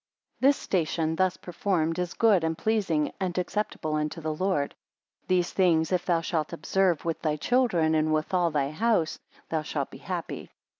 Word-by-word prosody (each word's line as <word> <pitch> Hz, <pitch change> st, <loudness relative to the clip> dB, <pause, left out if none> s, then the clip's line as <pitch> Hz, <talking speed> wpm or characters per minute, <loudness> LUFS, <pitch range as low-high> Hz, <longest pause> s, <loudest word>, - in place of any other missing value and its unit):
33 265 Hz, -, +5 dB
This 285 Hz, -, +3 dB
station, 160 Hz, -2 st, 0 dB
thus 185 Hz, +1 st, +1 dB
performed, 175 Hz, -2 st, -1 dB
is 180 Hz, 0 st, -3 dB
good 210 Hz, -7 st, +4 dB
and 160 Hz, 0 st, -1 dB
pleasing 190 Hz, -9 st, +1 dB
and 185 Hz, -2 st, -2 dB
acceptable 180 Hz, -4 st, -2 dB
unto 150 Hz, +1 st, -1 dB
the 155 Hz, -1 st, -2 dB
Lord. 155 Hz, -4 st, 0 dB, 0.5 s
These 180 Hz, -1 st, +1 dB
things 170 Hz, -4 st, +3 dB
if 180 Hz, -1 st, 0 dB
thou 170 Hz, -2 st, +2 dB
shalt 165 Hz, -1 st, -2 dB
observe 175 Hz, +1 st, +1 dB
with 165 Hz, -1 st, -2 dB
thy 155 Hz, -2 st, 0 dB
children 175 Hz, -, +2 dB
and 155 Hz, 0 st, +2 dB
with 155 Hz, +5 st, 0 dB
all 175 Hz, -2 st, +3 dB
thy 145 Hz, -2 st, 0 dB
house, 190 Hz, -2 st, +1 dB, 0.3 s
thou 160 Hz, -1 st, 0 dB
shalt 155 Hz, -, -3 dB
be -, -, -10 dB
happy. -, -, -5 dB
170 Hz, 180 wpm, -27 LUFS, 155-185 Hz, 0.5 s, 33